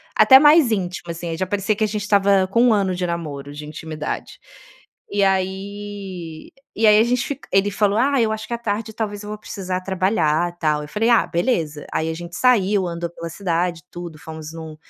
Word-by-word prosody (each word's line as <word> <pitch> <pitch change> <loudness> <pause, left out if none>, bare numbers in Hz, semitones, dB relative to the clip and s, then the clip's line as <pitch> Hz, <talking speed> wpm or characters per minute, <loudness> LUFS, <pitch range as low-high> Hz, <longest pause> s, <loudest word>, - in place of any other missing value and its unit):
até 265 0 +8
mais 295 -3 +6
íntima 180 -4 -3
assim, 170 +1 -6
aí 165 - -3
já 185 - -1
parecia 205 +2 0
que 215 - -1
a - - +3
gente 210 0 -3
estava 200 -2 +3
com 230 +5 +2
1 245 -2 +5
ano 195 -3 +1
de 180 0 -2
namoro 145 -5 -5
de 150 +1 -8
intimidade. 155 0 -6 0.7
E 205 0 +1
aí, 190 -3 -3
eh, - - -26
e 220 +1 +3
aí 210 0 +7
a - - +6
gente 245 +1 0
fic 285 -1 -6
ele 195 +1 +3
falou: 205 +1 +1
"Ah, 275 0 +3
eu 220 -1 +1
acho 220 0 -4
que 240 - -4
à - - -1
tarde 220 -1 -3
talvez 205 -2 -4
eu 210 - -8
vou 210 - -5
precisar 185 -3 -4
trabalhar 185 -3 +1
e 175 - -26
tal", 150 -2 +1
eu - - -8
falei: 220 +8 0
"Ah 235 - +4
beleza!". 165 - -1
Aí 160 - 0
a - - -2
gente 170 +1 -8
saiu 205 -6 +3
andou 170 0 -4
pela 170 0 -7
cidade 175 -2 -2
tudo, 175 -3 -8
fomos 160 0 -8
num 160 -1 -8
190 Hz, 220 wpm, -21 LUFS, 170-210 Hz, 0.7 s, até